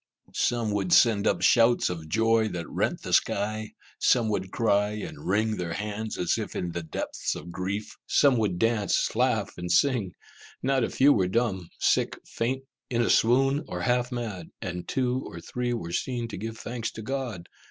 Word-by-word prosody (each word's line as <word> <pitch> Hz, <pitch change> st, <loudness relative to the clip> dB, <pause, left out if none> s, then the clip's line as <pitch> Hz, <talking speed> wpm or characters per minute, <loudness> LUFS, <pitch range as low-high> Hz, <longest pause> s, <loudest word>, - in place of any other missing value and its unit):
Some 115 Hz, -3 st, 0 dB
would 100 Hz, -3 st, -1 dB
send 110 Hz, -4 st, +5 dB
up -, -, +1 dB
shouts 120 Hz, 0 st, +5 dB
of 80 Hz, -3 st, -5 dB
joy 115 Hz, +3 st, +3 dB
that 85 Hz, -5 st, -5 dB
rent -, -, -1 dB
the -, -, -4 dB
sky; 110 Hz, +2 st, +1 dB, 0.3 s
some 115 Hz, -3 st, +3 dB
would 95 Hz, -3 st, -2 dB
cry 105 Hz, -3 st, +2 dB
and 85 Hz, -8 st, -7 dB
wring 110 Hz, +3 st, +1 dB
their 85 Hz, -2 st, -3 dB
hands 105 Hz, +3 st, -4 dB
as 90 Hz, -, 0 dB
if -, -, -5 dB
in 90 Hz, -, -2 dB
the 85 Hz, +1 st, -3 dB
depths 80 Hz, -, -3 dB
of 85 Hz, -, -8 dB
grief; 95 Hz, +4 st, -4 dB
some 140 Hz, -4 st, +4 dB
would 105 Hz, -6 st, 0 dB
dance, 110 Hz, -1 st, +1 dB
laugh, -, -, 0 dB
and 90 Hz, 0 st, -3 dB
sing; 120 Hz, -10 st, +2 dB, 0.5 s
not 135 Hz, -1 st, +2 dB
a -, -, 0 dB
few 145 Hz, +2 st, +5 dB
were 95 Hz, -3 st, +2 dB
dumb, 95 Hz, -4 st, -1 dB
sick, -, -, +2 dB
faint, 130 Hz, +3 st, -2 dB, 0.3 s
in 120 Hz, -1 st, +1 dB
a -, -, +2 dB
swoon, 135 Hz, +5 st, +3 dB
or 90 Hz, -, -4 dB
half 125 Hz, +5 st, +1 dB
mad; 110 Hz, -9 st, -5 dB
and 90 Hz, -1 st, -5 dB
two 130 Hz, 0 st, 0 dB
or -, -, -8 dB
three 125 Hz, 0 st, -3 dB
were 100 Hz, -8 st, -3 dB
seen 120 Hz, +1 st, -2 dB
to -, -, -6 dB
give 110 Hz, +3 st, -5 dB
thanks 115 Hz, -1 st, -4 dB
to 110 Hz, -, -7 dB
God. 125 Hz, -8 st, -4 dB
110 Hz, 185 wpm, -27 LUFS, 95-120 Hz, 0.5 s, send